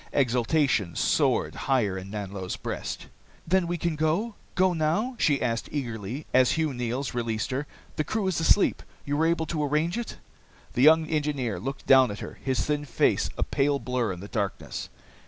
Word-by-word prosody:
Exultation 125 - +2
soared - - +2
higher 120 -8 0
in 95 0 -6
Nanlo's 100 -3 -4
breast. - - -5 0.4
"Then 185 +1 +2
we 175 0 -1
can 170 -1 -1
go? 160 +9 0 0.2
Go 185 0 +3
now?" 175 +11 0
she 145 -3 +3
asked 115 -2 -1
eagerly, 120 -1 -4
as 130 -1 +5
Hugh 160 -3 0
Neils 125 +3 -3
released 115 -3 -2
her. 135 +3 -2 0.3
"The 155 - +1
crew 215 +6 -2
is 190 -3 0
asleep? 175 +4 +3 0.2
You 145 - -1
were 160 +2 +3
able 165 -1 +1
to 155 -1 -2
arrange 155 +8 0
it?" 235 - -6 0.6
The 125 - 0
young 160 +3 +7
engineer 145 - -1
looked 135 +8 -5
down 130 -1 +6
at 100 - -5
her, - - -8
his 130 -2 0
thin 150 -1 -1
face 130 - +2
a - - +1
pale 140 0 +1
blur 125 -3 -1
in 90 -1 -6
the 100 - -7
darkness. 100 -3 -3
140 Hz, 180 wpm, -27 LUFS, 115-160 Hz, 0.6 s, young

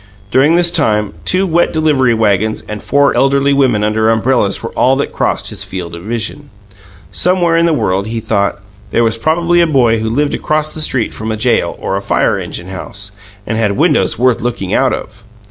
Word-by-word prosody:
During 145 +7 +4
this 175 -1 +3
time 105 - 0
two 185 +1 +2
wet 175 -1 +1
delivery 145 -7 +2
wagons 110 0 0
and 105 -1 -6
four 140 0 +2
elderly 140 +1 +2
women 130 -7 +2
under 110 +1 +1
umbrellas 115 -3 +1
were 115 - -5
all 130 +2 +2
that 140 - -3
crossed - - -1
his - - -5
field 90 -3 -6
of 85 - -8
vision. 115 +7 -5 0.6
Somewhere 180 -2 +2
in 165 0 +3
the - - +2
world, 100 -9 0
he 115 +1 -3
thought, 100 -2 -1 0.3
there 120 - +1
was 115 0 0
probably 170 +5 +2
a 170 - +3
boy 120 -7 +2
who 110 0 -2
lived 145 +5 0
across 155 0 -1
the 155 - -4
street 130 -6 -1
from 110 +1 -4
a 110 - -3
jail 105 - 0
or 95 - -2
a - - -3
fire - - +1
engine 85 - -7
house, 100 +1 -5 0.3
and 110 +1 -2
had 105 -3 0
windows 155 +1 +2
worth 125 -1 +2
looking 115 -5 -3
out 130 0 +2
of. 110 +1 -6
120 Hz, 200 wpm, -14 LUFS, 105-150 Hz, 0.6 s, During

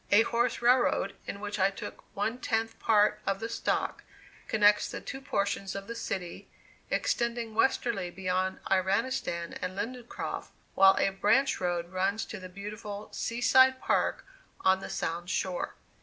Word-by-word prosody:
A 210 +2 +7
horse 235 +1 0
railroad, 245 +1 +3
in 200 - -5
which 205 0 -4
I 190 +1 +5
took 195 - -8
one 220 +5 -1
tenth 225 -2 -1
part 210 -1 +3
of 195 0 +1
the 225 - -3
stock, 230 - -1 0.4
connects 210 -1 +4
the - - -5
two 270 - -7
portions 200 -6 -1
of 195 0 -5
the 235 - -5
city, 180 -6 -5 0.4
extending 235 -1 -1
westerly 225 -5 +1
beyond 185 +1 -1
Iranistan 190 -2 0
and 185 +1 -4
Lindencroft, 240 +3 -5 0.2
while 195 0 +7
a 195 - +2
branch 210 +8 +2
road 175 -1 -1
runs 195 +4 0
to 210 - -7
the 185 0 -9
beautiful 205 +2 -7
"Sea 235 +1 -3
side 260 +1 +6
Park" - - 0 0.4
on 190 0 +4
the - - -7
Sound 170 +2 -3
shore. 185 -2 -2
205 Hz, 155 wpm, -30 LUFS, 190-230 Hz, 0.4 s, A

